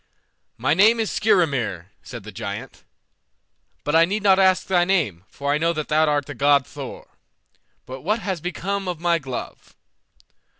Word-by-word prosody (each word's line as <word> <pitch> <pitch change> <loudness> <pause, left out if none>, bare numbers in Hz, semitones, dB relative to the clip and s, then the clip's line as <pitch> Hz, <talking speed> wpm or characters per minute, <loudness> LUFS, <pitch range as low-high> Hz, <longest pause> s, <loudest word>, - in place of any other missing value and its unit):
"My 130 +6 +1
name 215 +7 +5
is 220 - -1
Skrymir," 140 - 0
said 120 -4 -9
the 110 - -9
giant, 100 +1 -7 1.0
"but 150 - -1
I 165 - +7
need 200 +5 -1
not 195 -1 +5
ask 190 -1 +3
thy 180 -2 +2
name, 155 - 0
for 140 +1 -2
I 150 - 0
know 165 +1 +1
that 155 -2 -4
thou 155 +1 +3
art 145 -2 +1
the 145 - -7
god 140 +1 +3
Thor. - - -9 0.8
But 130 +1 -8
what 210 - 0
has 190 -7 -4
become 195 +3 -3
of 175 -3 -3
my 170 0 +1
glove?" 130 -4 -8
160 Hz, 170 wpm, -22 LUFS, 135-190 Hz, 1.0 s, I